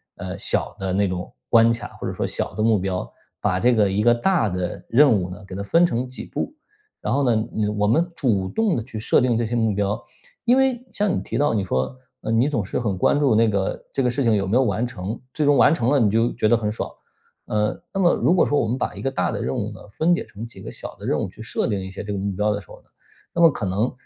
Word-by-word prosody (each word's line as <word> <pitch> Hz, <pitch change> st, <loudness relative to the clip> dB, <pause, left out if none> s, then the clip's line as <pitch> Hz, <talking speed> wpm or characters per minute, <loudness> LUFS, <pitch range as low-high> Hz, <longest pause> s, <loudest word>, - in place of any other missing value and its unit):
呃， -, -, -6 dB
小 -, -, -1 dB
的 95 Hz, -1 st, -2 dB
那 100 Hz, +1 st, +2 dB
种 90 Hz, -1 st, -4 dB, 0.2 s
关 115 Hz, 0 st, +6 dB
卡， 115 Hz, -, -3 dB
或 -, -, -4 dB
者 -, -, -3 dB
说 -, -, -2 dB
小 -, -, -3 dB
的 110 Hz, -, -1 dB
目 110 Hz, -2 st, +4 dB
标， 90 Hz, 0 st, -3 dB, 0.3 s
把 90 Hz, -, +1 dB
这 120 Hz, +4 st, +4 dB
个 105 Hz, -3 st, +3 dB
一 100 Hz, +2 st, +1 dB
个 120 Hz, +2 st, +5 dB
大 120 Hz, -, +2 dB
的 90 Hz, -2 st, -3 dB
任 140 Hz, +3 st, +6 dB
务 95 Hz, -5 st, +1 dB
呢， 90 Hz, +3 st, -9 dB
给 95 Hz, -, -9 dB
它 95 Hz, -, -4 dB
分 165 Hz, +13 st, +4 dB
成 125 Hz, -5 st, -1 dB
几 125 Hz, -, -8 dB
步， 295 Hz, -, -4 dB, 0.5 s
然 -, -, -1 dB
后 140 Hz, -2 st, +2 dB
呢， 110 Hz, -1 st, +1 dB, 0.3 s
我 -, -, -2 dB
我 105 Hz, -, +3 dB
们 165 Hz, +10 st, +2 dB
主 100 Hz, -, +1 dB
动 185 Hz, -, 0 dB
去 120 Hz, -3 st, -8 dB
设 110 Hz, -, +3 dB
定 125 Hz, -2 st, +2 dB
这 120 Hz, -, 0 dB
些 115 Hz, -, -4 dB
目 110 Hz, -3 st, +1 dB
标。 100 Hz, 0 st, -1 dB, 0.4 s
因 245 Hz, +1 st, +5 dB
为 260 Hz, -2 st, +1 dB
像 205 Hz, -2 st, +1 dB
你 -, -, -1 dB
提 -, -, -4 dB
到 145 Hz, -4 st, +2 dB
你 105 Hz, -3 st, 0 dB
说， 65 Hz, -, -1 dB, 0.3 s
呃， 110 Hz, -, -3 dB
你 115 Hz, +4 st, +3 dB
总 120 Hz, -8 st, -1 dB
是 95 Hz, -, -2 dB
很 105 Hz, -6 st, -1 dB
关 145 Hz, -, +3 dB
注 135 Hz, -6 st, +3 dB
那 115 Hz, +1 st, +4 dB
个 100 Hz, -3 st, -1 dB
这 -, -, 0 dB
个 125 Hz, -, +2 dB
事 125 Hz, +3 st, -1 dB
情 115 Hz, -3 st, +3 dB
有 100 Hz, -2 st, 0 dB
没 110 Hz, +6 st, +2 dB
有 135 Hz, -, +4 dB
完 110 Hz, 0 st, 0 dB
成， 110 Hz, -3 st, -5 dB
最 155 Hz, -, 0 dB
终 145 Hz, 0 st, +5 dB
完 140 Hz, +3 st, +6 dB
成 120 Hz, -6 st, 0 dB
了 140 Hz, 0 st, +4 dB
你 110 Hz, -, +4 dB
就 115 Hz, +2 st, +2 dB
觉 -, -, +1 dB
得 120 Hz, -, +5 dB
很 105 Hz, -2 st, -1 dB
爽。 105 Hz, -, -4 dB, 0.5 s
呃， 105 Hz, 0 st, -1 dB
那 195 Hz, -, -1 dB
么 175 Hz, -2 st, +4 dB
如 -, -, +2 dB
果 180 Hz, -, +4 dB
说 145 Hz, -, +2 dB
我 115 Hz, -, 0 dB
们 115 Hz, -, 0 dB
把 -, -, -2 dB
一 -, -, -7 dB
个 135 Hz, -, -1 dB
大 -, -, 0 dB
的 -, -, -3 dB
任 65 Hz, -, -2 dB
务 -, -, -2 dB
呢， -, -, -11 dB
分 165 Hz, +11 st, +2 dB
解 -, -, -4 dB
成 105 Hz, +3 st, -8 dB
几 115 Hz, -, -11 dB
个 -, -, -7 dB
小 -, -, -8 dB
的 -, -, -10 dB
任 -, -, +1 dB
务 -, -, -1 dB
去 105 Hz, -, -13 dB
设 -, -, -1 dB
定 105 Hz, -3 st, -1 dB
一 95 Hz, 0 st, -6 dB
些 95 Hz, -, -6 dB
这 105 Hz, -, -5 dB
个 100 Hz, -, -2 dB
目 100 Hz, +1 st, -2 dB
标 105 Hz, +3 st, 0 dB
的 100 Hz, -, -4 dB
时 90 Hz, -, -21 dB
候 -, -, -12 dB
呢， -, -, -34 dB, 0.5 s
那 170 Hz, -, 0 dB
么 165 Hz, -1 st, +8 dB
可 110 Hz, -, -4 dB
能 100 Hz, +6 st, 0 dB
115 Hz, 310 characters per minute, -23 LUFS, 100-135 Hz, 0.5 s, 么